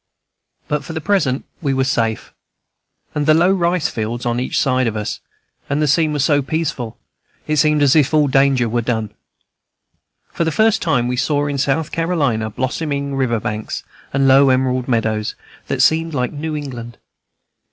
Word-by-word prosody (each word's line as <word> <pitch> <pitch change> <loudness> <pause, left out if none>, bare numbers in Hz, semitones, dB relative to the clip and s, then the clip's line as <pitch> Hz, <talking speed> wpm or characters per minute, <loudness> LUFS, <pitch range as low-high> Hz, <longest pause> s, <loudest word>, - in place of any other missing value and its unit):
But 150 0 -1
for 165 - -7
the 160 - -3
present 160 -8 0 0.2
we 140 -4 0
were 130 - +2
safe, 115 -4 -1 0.8
with 150 -1 -1
the 155 - +6
low 175 +3 +4
rice 175 -3 +1
fields 115 +2 -4
on 120 0 0
each 125 - -2
side 130 -2 +1
of 110 - -2
us; 105 - -4 0.5
and 145 +1 0
the 150 - +2
scene 155 +2 +2
was 145 -2 +1
so 145 -2 +3
peaceful, 140 -6 -3 0.5
it 155 0 -1
seemed 150 0 +3
as 140 0 +4
if 150 -4 +4
all 155 -2 +3
danger 135 -2 +3
were 120 +1 0
done. 110 -3 -2 1.2
For - - -1
the 160 - 0
first 220 +5 +2
time, 125 -8 +1
we 125 0 -2
saw 145 +2 +1
in 140 -1 -2
South 140 +3 0
Carolina 145 -10 0
blossoming 140 +4 -3
river 125 -4 0
banks 105 +1 -4 0.3
and 135 0 +2
low 135 +1 +6
emerald 130 -1 +1
meadows, 110 -3 -1 0.3
that - - +1
seemed 160 0 +2
like 125 -2 -1
New 155 +1 -4
England. 120 -5 -7
140 Hz, 175 wpm, -19 LUFS, 125-155 Hz, 1.2 s, the